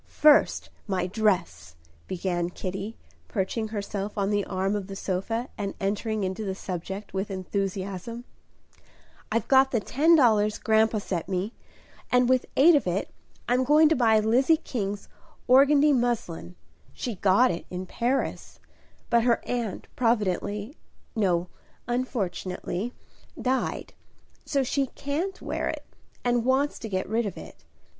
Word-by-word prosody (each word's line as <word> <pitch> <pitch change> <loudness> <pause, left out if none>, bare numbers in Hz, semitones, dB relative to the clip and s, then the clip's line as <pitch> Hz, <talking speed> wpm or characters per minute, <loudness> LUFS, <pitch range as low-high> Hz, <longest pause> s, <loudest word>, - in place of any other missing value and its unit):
"First, 300 -1 +4 0.2
my 185 -3 0
dress," 185 - -1 0.3
began 175 -1 -1
Kitty, 195 +4 -5 0.3
perching 220 +2 -2
herself 205 -1 -4
on 200 0 +1
the 205 -1 +1
arm 190 +2 -1
of 200 -2 -3
the 195 - -7
sofa, 215 +7 -2
and 200 -1 -3
entering 210 +2 -1
into 190 +3 -2
the 190 -2 -3
subject 190 +2 -6
with 195 +2 -2
enthusiasm. 195 +3 -4 1.1
"I've 230 +2 0
got 265 0 +5
the 240 - +1
ten 305 +10 +4
dollars 215 -7 +4
grandpa 220 0 +2
sent 185 -4 -3
me, 190 +4 -2 0.6
and 250 0 +4
with 255 0 +2
eight 325 +6 +7
of 290 -10 +2
it 180 +3 -2 0.3
I'm 250 +2 +3
going 300 +3 +5
to 320 - +3
buy 225 -3 +4
Lizzie 250 +9 +3
King's 205 -9 -4 0.4
organdie 280 +3 +6
muslin. 235 -9 -1 0.4
She 245 - -4
got 200 +6 +4
it 170 - -6
in 180 +1 -5
Paris; 245 +8 -2 0.5
but 235 - +5
her 235 0 +3
aunt 235 -5 -3
providentially 210 - 0 0.4
no, 180 -5 +1 0.4
unfortunately 220 -3 -3 0.4
died; 260 +1 -1 0.5
so 275 -2 +1
she 275 +1 0
can't 310 +10 -3
wear - - -2
it, - - -5 0.4
and 240 -1 +2
wants 265 +3 +1
to 225 - -6
get 185 -1 -2
rid 225 +1 0
of 200 - -6
it. - - -11
215 Hz, 140 wpm, -26 LUFS, 190-250 Hz, 1.1 s, eight